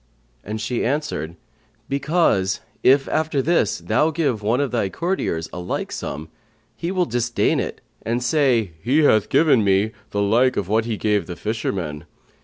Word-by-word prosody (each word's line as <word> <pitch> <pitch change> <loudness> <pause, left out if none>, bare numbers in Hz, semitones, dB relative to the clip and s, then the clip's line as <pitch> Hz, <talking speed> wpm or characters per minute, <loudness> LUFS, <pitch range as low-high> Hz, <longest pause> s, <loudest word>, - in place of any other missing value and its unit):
and 110 +2 -5
she 115 +2 -2
answered, 130 - -2 0.5
"Because 140 - +1 0.2
if, 135 +1 +4
after 155 -2 0
this, 165 +6 +2
though 155 - +1
give 145 -9 -1
one 110 +5 +1
of 140 -3 0
thy 115 -5 0
courtiers 165 - -2
a - - -5
like 90 - -3
sum, 75 +3 -5 0.5
he 165 +9 -4
will 185 -2 +1
disdain 120 -4 0
it - - -4 0.2
and 120 +3 -2
say, 125 - +2
He 140 +7 +2
hath 110 -7 +4
but - - -26
given 145 -8 +4
me 100 +2 +2 0.2
the 100 0 0
like 120 +5 +3
of 100 - -1
what 110 +2 +1
he 115 -2 -2
gave 105 -5 0
the 90 - -5
fisherman.' 90 -6 -3
115 Hz, 170 wpm, -22 LUFS, 100-140 Hz, 0.5 s, if